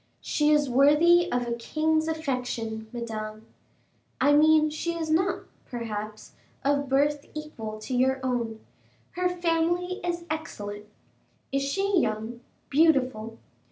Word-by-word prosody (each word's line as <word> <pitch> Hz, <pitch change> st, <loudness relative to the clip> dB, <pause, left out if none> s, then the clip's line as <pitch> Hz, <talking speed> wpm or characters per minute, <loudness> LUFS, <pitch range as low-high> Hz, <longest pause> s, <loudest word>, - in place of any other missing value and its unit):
"She 300 Hz, 0 st, +1 dB
is 295 Hz, -1 st, +4 dB
worthy 300 Hz, +7 st, +5 dB
of 245 Hz, -1 st, 0 dB
a 235 Hz, -, -1 dB
king's 315 Hz, +6 st, 0 dB
affection, 250 Hz, -8 st, -3 dB
Madame." 220 Hz, -2 st, -5 dB, 0.7 s
"I 290 Hz, -, +4 dB
mean, 310 Hz, +1 st, +5 dB
she 335 Hz, +3 st, -3 dB
is 320 Hz, -2 st, -3 dB
not, 370 Hz, +5 st, +1 dB, 0.2 s
perhaps, 215 Hz, -3 st, -6 dB, 0.3 s
of 285 Hz, -1 st, +1 dB
birth 285 Hz, +2 st, +1 dB
equal 230 Hz, -9 st, -6 dB
to 255 Hz, +3 st, -3 dB
your 265 Hz, +2 st, +2 dB
own." 235 Hz, -3 st, -2 dB, 0.5 s
"Her 360 Hz, 0 st, 0 dB
family 350 Hz, +1 st, 0 dB
is 345 Hz, -1 st, -2 dB
excellent." 210 Hz, -10 st, -5 dB, 0.6 s
"Is 275 Hz, 0 st, +1 dB
she 390 Hz, +7 st, +1 dB
young, 220 Hz, -1 st, -2 dB, 0.3 s
beautiful?" 260 Hz, -7 st, +2 dB
280 Hz, 125 wpm, -27 LUFS, 235-320 Hz, 0.7 s, worthy